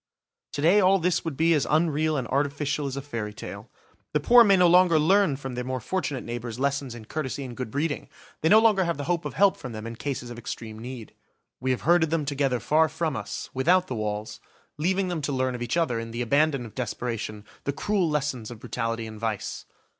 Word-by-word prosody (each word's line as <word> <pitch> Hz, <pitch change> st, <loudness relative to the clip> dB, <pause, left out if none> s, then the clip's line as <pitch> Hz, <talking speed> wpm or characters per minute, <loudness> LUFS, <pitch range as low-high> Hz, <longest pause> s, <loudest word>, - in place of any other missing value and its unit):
To 145 Hz, -, -3 dB
day 180 Hz, +6 st, +6 dB
all 190 Hz, +1 st, +5 dB
this 180 Hz, -1 st, 0 dB
would 160 Hz, -5 st, -4 dB
be 165 Hz, +1 st, +4 dB
as 150 Hz, -4 st, +1 dB
unreal 155 Hz, -1 st, +2 dB
and 125 Hz, -3 st, -2 dB
artificial 145 Hz, +1 st, 0 dB
as 135 Hz, 0 st, -4 dB
a 140 Hz, -, -4 dB
fairy 115 Hz, -7 st, -5 dB
tale. -, -, -8 dB, 0.4 s
The 150 Hz, -, +3 dB
poor 240 Hz, +10 st, +7 dB
may 200 Hz, -3 st, +5 dB
no 180 Hz, -, +5 dB
longer 175 Hz, -1 st, +6 dB
learn 175 Hz, 0 st, +4 dB
from 135 Hz, -1 st, -6 dB
their 125 Hz, 0 st, -3 dB
more 130 Hz, +1 st, -3 dB
fortunate 145 Hz, 0 st, -2 dB
neighbours 120 Hz, 0 st, -5 dB
lessons 140 Hz, -2 st, -1 dB
in 110 Hz, -2 st, -10 dB
courtesy 140 Hz, +1 st, -4 dB
and 125 Hz, -2 st, -7 dB
good 130 Hz, -2 st, -4 dB
breeding, 145 Hz, +5 st, -2 dB, 0.3 s
they 160 Hz, -, +2 dB
no 215 Hz, -, +8 dB
longer 220 Hz, -4 st, +5 dB
have 170 Hz, -4 st, -1 dB
the 145 Hz, -, -4 dB
hope 170 Hz, +2 st, -1 dB
of -, -, -5 dB
help 200 Hz, -1 st, +4 dB
from 125 Hz, -4 st, -7 dB
them 110 Hz, 0 st, -6 dB
in 115 Hz, 0 st, -6 dB
cases 125 Hz, -1 st, -4 dB
of 120 Hz, -, -7 dB
extreme 110 Hz, -1 st, -7 dB
need. 120 Hz, -1 st, -8 dB, 0.5 s
We 130 Hz, -, -2 dB
have 130 Hz, -, 0 dB
herded 165 Hz, -1 st, +4 dB
them 160 Hz, -2 st, 0 dB
together 140 Hz, -3 st, 0 dB
far 160 Hz, +4 st, +3 dB
from 155 Hz, -1 st, -2 dB
us, -, -, -5 dB
without 175 Hz, +7 st, +3 dB
the 130 Hz, -, -5 dB
walls, 105 Hz, -1 st, -4 dB, 0.4 s
leaving 185 Hz, +5 st, 0 dB
them 170 Hz, -3 st, -2 dB
to 145 Hz, -, -2 dB
learn 130 Hz, -1 st, 0 dB
of 125 Hz, -, -6 dB
each 120 Hz, +7 st, -1 dB
other, 140 Hz, -9 st, +1 dB
in 115 Hz, 0 st, -5 dB
the 120 Hz, +2 st, -3 dB
abandon 140 Hz, +1 st, +2 dB
of 110 Hz, -, -11 dB
desperation, 115 Hz, -3 st, -4 dB, 0.2 s
the 140 Hz, -, +1 dB
cruel 185 Hz, +3 st, 0 dB
lessons 140 Hz, -7 st, -2 dB
of 120 Hz, -, -8 dB
brutality 115 Hz, -1 st, -3 dB
and 110 Hz, -1 st, -9 dB
vice. 110 Hz, -3 st, -3 dB
140 Hz, 230 wpm, -26 LUFS, 120-165 Hz, 0.5 s, no